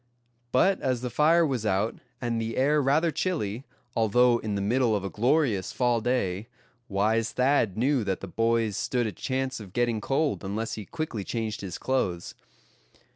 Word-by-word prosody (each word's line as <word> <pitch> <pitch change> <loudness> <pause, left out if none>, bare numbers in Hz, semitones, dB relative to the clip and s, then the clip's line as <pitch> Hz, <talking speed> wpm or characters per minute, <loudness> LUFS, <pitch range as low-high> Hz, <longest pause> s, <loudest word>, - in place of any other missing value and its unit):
But 190 +9 +3
as 130 -3 0
the 125 -1 -4
fire 165 +5 +4
was 130 -7 -1
out, 105 +1 0 0.2
and 115 -2 -1
the 115 0 -3
air 145 +3 +3
rather 150 +5 +2
chilly, 135 - -2 0.3
although 120 +2 +4
in 105 -2 -3
the - - -1
middle 115 +2 +2
of 100 - -2
a 95 - -4
glorious 120 - +1
fall 120 -2 +1
day, 110 -4 -1 0.4
wise 110 +3 +1
Thad 125 -6 +2
knew 130 +1 +2
that 95 -2 -1
the 95 - -7
boys 115 +1 +1
stood 120 +2 0
a 110 - -2
chance 130 +2 -3
of 100 -4 -11
getting 120 -3 0
cold 140 +1 0
unless 105 +4 -3
he 105 - -6
quickly 155 -10 -4
changed 110 0 -3
his 95 -3 -5
clothes. 95 -10 -1
115 Hz, 175 wpm, -27 LUFS, 105-130 Hz, 0.4 s, fire